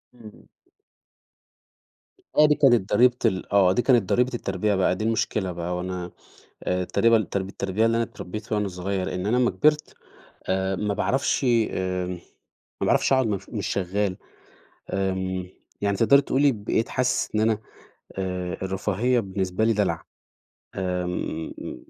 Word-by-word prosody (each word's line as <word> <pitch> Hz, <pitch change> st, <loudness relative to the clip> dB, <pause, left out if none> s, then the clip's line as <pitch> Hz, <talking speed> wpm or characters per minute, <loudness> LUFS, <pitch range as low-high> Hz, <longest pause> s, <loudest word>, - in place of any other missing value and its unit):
إمم. 110 Hz, -3 st, -14 dB, 1.9 s
آه، 150 Hz, -, +8 dB
دي 150 Hz, -, +3 dB
كانت 120 Hz, -8 st, +3 dB
ضريبة 125 Hz, 0 st, +5 dB
ال 95 Hz, +1 st, 0 dB
آه، 95 Hz, -2 st, +5 dB
دي 125 Hz, -, +2 dB
كانت 120 Hz, -8 st, +3 dB
ضريبة 125 Hz, +1 st, +2 dB
التربية 100 Hz, -2 st, -1 dB
بقى، 95 Hz, -1 st, +2 dB
دي 110 Hz, -, -4 dB
المشكلة 110 Hz, -4 st, 0 dB
بقى 85 Hz, +1 st, -4 dB
وأنا 90 Hz, -1 st, -4 dB, 0.5 s
آآ 90 Hz, 0 st, 0 dB
تقريبًا 115 Hz, +2 st, +2 dB
ترب 95 Hz, -1 st, -2 dB
التربية 100 Hz, +3 st, -1 dB
اللي 115 Hz, 0 st, +2 dB
أنا 115 Hz, -, +2 dB
اتربّيتها 110 Hz, +2 st, -6 dB
وأنا 105 Hz, -1 st, 0 dB
صغيّر 95 Hz, +1 st, -3 dB
إن 90 Hz, -, -3 dB
أنا 115 Hz, +4 st, +2 dB
أمّا 120 Hz, -4 st, +3 dB
كبِرت 150 Hz, +11 st, +1 dB, 0.5 s
آآ، 95 Hz, 0 st, 0 dB
ما 105 Hz, +1 st, -1 dB
باعرفش 135 Hz, +7 st, 0 dB
آمم 95 Hz, -7 st, 0 dB, 0.7 s
ما -, -, +2 dB
باعرفش -, -, +3 dB
أقعُد 130 Hz, -3 st, +3 dB
مش 100 Hz, -2 st, -3 dB
مش 105 Hz, -4 st, -3 dB
شغّال 95 Hz, 0 st, -1 dB, 0.7 s
آمم، 95 Hz, -1 st, -2 dB, 0.3 s
يعني 100 Hz, -1 st, 0 dB
تقدَري 140 Hz, +6 st, +5 dB
تقولي 140 Hz, 0 st, +2 dB
بقيت 110 Hz, +2 st, -1 dB
حاسس 125 Hz, 0 st, 0 dB
إن 105 Hz, -, +2 dB
أنا 110 Hz, -1 st, +2 dB, 0.6 s
آآ، 90 Hz, -2 st, -3 dB
الرفاهية 105 Hz, +6 st, 0 dB
بالنسبة 95 Hz, +1 st, -2 dB
لي 115 Hz, -, +3 dB
دلَع. 100 Hz, -6 st, 0 dB, 0.7 s
آمم. 90 Hz, -3 st, -3 dB
إمم. -, -, -9 dB
100 Hz, 150 wpm, -25 LUFS, 95-115 Hz, 1.9 s, آه